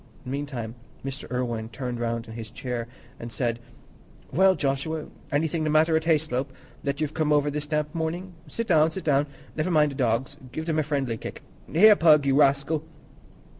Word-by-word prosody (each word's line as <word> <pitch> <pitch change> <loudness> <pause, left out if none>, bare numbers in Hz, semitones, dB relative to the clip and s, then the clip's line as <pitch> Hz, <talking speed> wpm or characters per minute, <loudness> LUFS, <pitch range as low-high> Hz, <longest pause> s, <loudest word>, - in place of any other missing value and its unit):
Meantime, 130 -4 -4 0.3
Mr. 135 -1 -5
Irwine 120 -3 -2
turned 125 0 -4
round 115 0 -2
his 110 -1 -8
chair 120 0 -4 0.3
and 115 0 -7
said, 120 -1 -1 0.7
"Well, 190 +2 +5
Joshua, 145 +2 -1 0.3
anything 155 +2 0
the 155 - 0
matter 155 +1 +4
at 160 0 +1
Hayslope, 150 -5 +1 0.3
that 140 0 -2
you've 155 -1 -1
come 155 -2 0
over 145 0 +3
this 150 0 -3
damp 150 0 -1
morning? 170 +3 -3
Sit 230 - -3
down, 160 -5 +4
sit 190 +3 -6
down. 145 -1 +2 0.3
Never 155 +3 0
mind 150 -4 +4
the - - -7
dogs; 130 +2 0
give 160 +4 -4
them 160 -2 +1
a - - +4
friendly 140 -6 -1
kick. - - -8 0.3
Here, 210 +7 +8
Pug, 155 -5 +5
you 135 -1 +3
rascal!" 140 +2 +3
145 Hz, 175 wpm, -26 LUFS, 125-160 Hz, 0.7 s, Here